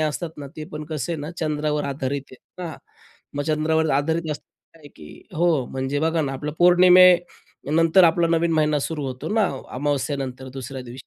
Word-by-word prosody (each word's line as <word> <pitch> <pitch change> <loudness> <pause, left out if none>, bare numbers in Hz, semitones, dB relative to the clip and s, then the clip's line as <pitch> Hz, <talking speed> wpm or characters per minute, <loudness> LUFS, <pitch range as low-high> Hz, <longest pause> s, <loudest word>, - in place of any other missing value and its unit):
असतात 155 +2 -2
ना, 145 - -6
ते 155 - -6
पण 150 0 -5
कसं 155 -1 -3
आहे 160 - -4
ना, 150 +2 -5
चंद्रावर 150 -1 -1
आधारित 135 0 -4
आहे 130 - -13 0.3
ना. 160 - -7 0.6
मग 145 - -1
चंद्रावर 160 +1 +1
आधारित 160 +4 0
अस 150 - -7 0.4
आहे 150 -3 -14
की 75 -1 -12 0.3
हो, 170 +3 +1 0.2
म्हणजे 135 +3 -3
बघा 160 +1 +1
ना, 135 -2 -2
आपलं 145 +3 -4
पौर्णिमेनंतर 180 -1 +5
आपला 170 0 +3
नवीन 165 0 +1
महिना 150 -1 +2
सुरू 150 0 -3
होतो 130 -1 -5
ना, 220 -2 +3 0.3
अमावास्येनंतर 135 -2 -2
दुसऱ्या 130 0 -6
दिवशी. 125 +1 -11
150 Hz, 175 wpm, -23 LUFS, 140-165 Hz, 0.6 s, पौर्णिमेनंतर